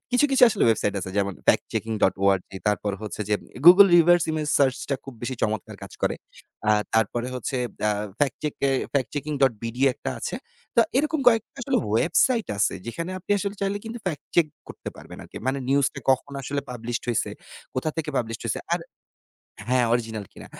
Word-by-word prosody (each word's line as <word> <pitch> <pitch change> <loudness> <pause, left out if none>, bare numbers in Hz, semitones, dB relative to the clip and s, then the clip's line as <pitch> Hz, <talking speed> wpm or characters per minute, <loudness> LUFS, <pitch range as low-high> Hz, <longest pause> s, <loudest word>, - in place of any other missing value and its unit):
কিছু, 250 +3 +4
কিছু 270 - +2
আসলে 225 - -1
ওয়েবসাইট 105 -2 +1
আছে 95 - -5
যেমন 100 0 0
'FactChecking.org' 100 -3 +1 0.2
তারপর 105 0 +1
হচ্ছে 110 0 -6
যে 105 - +3 0.3
'গুগল 185 +4 +10
রিভার্স 175 +1 +5
ইমেজ 155 -1 -2
সার্চ' 135 -2 +3
টা - - +3
খুব 135 -2 -9
বেশি 130 +2 -2
চমৎকার 110 -3 -2
কাজ - - -9
করে। - - +1 0.5
আ - - +6 0.2
তারপরে 115 +2 +1
হচ্ছে 125 +2 -3 0.3
অ্যা 105 - +3 0.3
ফ্যাক্ট 140 -4 +1
চেক 150 - -2
এ - - +2 0.2
'FactChecking.bd' 135 -4 -1
একটা - - -5
আছে। - - -4 0.4
তো - - +8 0.2
এরকম 305 +1 0
কয়েকটা 225 -2 +1
আসলে 260 0 +1
ওয়েবসাইট 225 - +2
আছে 100 - +2
যেখানে 165 +9 -4
আপনি 185 - -14
আসলে 200 0 -3
চাইলে 200 +1 -1
কিন্তু 225 +2 -6
ফ্যাক্ট 150 -5 -3
চেক 170 -2 +5 0.2
করতে - - -8
পারবেন - - -11
আরকি। - - -14
মানে 135 +1 0
নিউজটা 140 0 +1
কখন 135 +2 +1
আসলে 140 +2 -2
পাবলিশড 120 0 -4
হইছে, 120 - 0 0.4
কোথা 130 +5 -1
থেকে 160 -2 -2
পাবলিশড 115 -2 -2
হয়েছে। - - -2
আর - - +2 0.9
হ্যাঁ, 125 -1 +3
অরিজিনাল 110 -3 -1
কিনা। - - -12
135 Hz, 175 wpm, -25 LUFS, 115-170 Hz, 0.9 s, গুগল